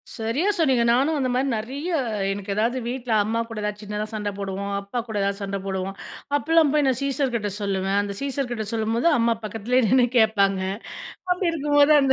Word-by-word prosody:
சரியா 230 - -1
சொன்னீங்க. 265 -7 +3
நானும் 280 +6 +2
அந்த 260 -2 0
மாதிரி 260 +2 +1
நெறைய, 275 +10 -5 0.4
எனக்கு 200 0 -3
ஏதாவது 235 +4 +1
வீட்டுல 245 -1 -4
அம்மா 225 +2 -1
கூடச் 210 -2 -4
சின்னதா 210 0 -3
சண்ட 210 -1 -2
போடுவோம். 200 0 -4
அப்பா 200 +5 -4
கூட 220 - -6
எதாவது 200 +1 -1
சண்ட 195 0 -2
போடுவோம். 190 0 -3 0.4
அப்பல்லாம் 320 -1 +3
போய் 295 -3 +3
சீசர் 275 -2 0
கிட்ட 210 -2 -1
சொல்லுவேன். 195 0 0
அந்தச் 200 -1 -3
சீசர் 275 -2 -2
கிட்ட 220 -3 -3
சொல்லும்போது 225 +6 +1
அம்மா 230 0 +2
பக்கத்துல 225 +4 0
நின்னு 250 +1 +5
கேப்பாங்க. 200 -4 +3 0.7
அப்படி 360 -1 +2
இருக்கும்போது 290 -1 +4
அந்த 265 -1 +4
230 Hz, 175 wpm, -24 LUFS, 205-270 Hz, 0.7 s, நின்னு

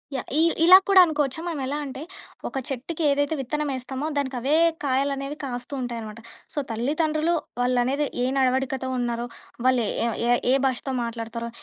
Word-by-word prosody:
Yeah! 260 - -4
ఈ - - +5 0.2
ఇలా 365 +2 +10
కూడా 390 -1 +7
అనుకోవచ్చా? 295 -3 -1
మనం 330 -5 -3
ఎలా 280 +3 -2
అంటే 270 0 -7 0.5
ఒక - - -5
చెట్టుకి 280 +5 -4
ఏదైతే 285 +2 +1
విత్తనమేస్తామో 270 0 -3
దానికవే 265 0 0 0.3
కాయలనేవి 275 +1 0
కాస్తూ 245 +1 -5
ఉంటాయి 240 -2 -4
అనమాట. 215 +1 -8 0.3
సో, - - -13
తల్లిదండ్రులు 310 +7 0 0.3
వాళ్ళనేది 250 +4 +1 0.2
ఏ - - +2
నడవడికతో 260 0 +1
ఉన్నారో, 240 -1 -2 0.4
వాళ్ళే 255 -4 +3 0.4
ఏ - - +3 0.2
ఏ - - +5
భాషతో 260 +1 -2
మాట్లాడతారో, 230 0 -5
265 Hz, 145 wpm, -25 LUFS, 245-290 Hz, 0.5 s, ఇలా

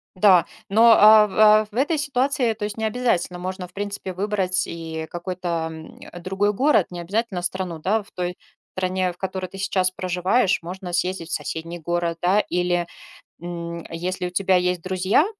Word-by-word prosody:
Да. 185 -2 +5 0.2
Но, 225 +4 +6
а 215 0 +8
в 210 - -5 0.2
а - - -12
в - - -26
этой 295 +6 +1
ситуации, 265 -4 +1
то 210 -1 -4
есть 210 +1 -5
необязательно 220 -6 -1
можно, 185 0 -5
в 180 - -24
принципе, 200 -2 -5
выбрать 190 -1 0
и 160 -1 -6
какой-то, 175 -2 -3
м, 160 0 -11
э, 175 - -9
другой 195 +3 0
город, 260 - +3
необязательно 185 +3 -3
страну, 180 -2 -3
да? 205 +6 0
В - - -22
той 180 0 -4 0.4
стране, 185 0 0
в 175 - -16
которой 190 0 -4
ты 195 +2 -11
сейчас 190 -1 +1
проживаешь, 185 +4 +1
можно 180 +1 -7
съездить 180 -1 -1
в - - -3
соседний 165 +2 -4
город, 170 0 -2
да. 190 +4 +3
Или, 175 -1 0 0.5
м, 170 -1 -6
если 180 +2 -3
у - - -4
тебя 190 0 +2
есть 180 -1 0
друзья, 185 - +2
185 Hz, 175 wpm, -23 LUFS, 175-205 Hz, 0.5 s, а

